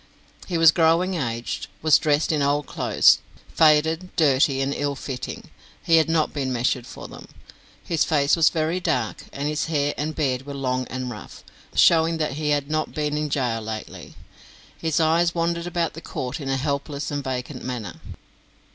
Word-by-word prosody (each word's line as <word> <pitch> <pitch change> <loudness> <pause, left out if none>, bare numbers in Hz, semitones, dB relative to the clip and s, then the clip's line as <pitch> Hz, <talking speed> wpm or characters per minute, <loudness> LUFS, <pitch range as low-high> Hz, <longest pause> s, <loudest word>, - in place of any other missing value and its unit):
He 175 - -1
was 165 -1 +7
growing 170 +3 +2
aged, 120 -8 -3 0.2
was 155 -2 +6
dressed 150 +1 +1
in 150 -2 0
old 145 +1 +1
clothes, - - +3 0.3
faded, 160 +3 +3
dirty, 140 -3 +3
and 135 +1 0
ill 145 0 -2
fitting; 130 -2 -7 0.3
he 165 - +4
had 160 0 +3
not 160 -2 +1
been 135 -3 -2
measured 125 0 -1
for - - -9
them. - - -12 0.6
His 165 -3 +1
face 145 -2 +2
was 165 -3 +5
very 160 +2 -1
dark, 125 -10 -2
and 140 +1 -3
his 150 +1 -1
hair 145 -3 0
and 155 +1 -2
beard 135 -3 -1
were 140 - -6
long 130 -2 -2
and 130 -1 -4
rough, 105 -4 -10 0.3
showing 165 0 +4
that 155 -1 -1
he 150 +2 -2
had 145 -1 +1
not 155 +1 -2
been 150 -1 -1
in 150 0 -1
gaol 125 -5 -1
lately. 110 0 -7 0.6
His 160 0 -1
eyes 170 +2 +2
wandered 170 0 -1
about 170 -1 -1
the 165 - -9
court 130 -2 -5
in 135 - -4
a 135 - +1
helpless 140 +1 -3
and 145 -1 -3
vacant 130 +1 -5
manner. 120 -8 -5
145 Hz, 180 wpm, -23 LUFS, 135-160 Hz, 0.6 s, was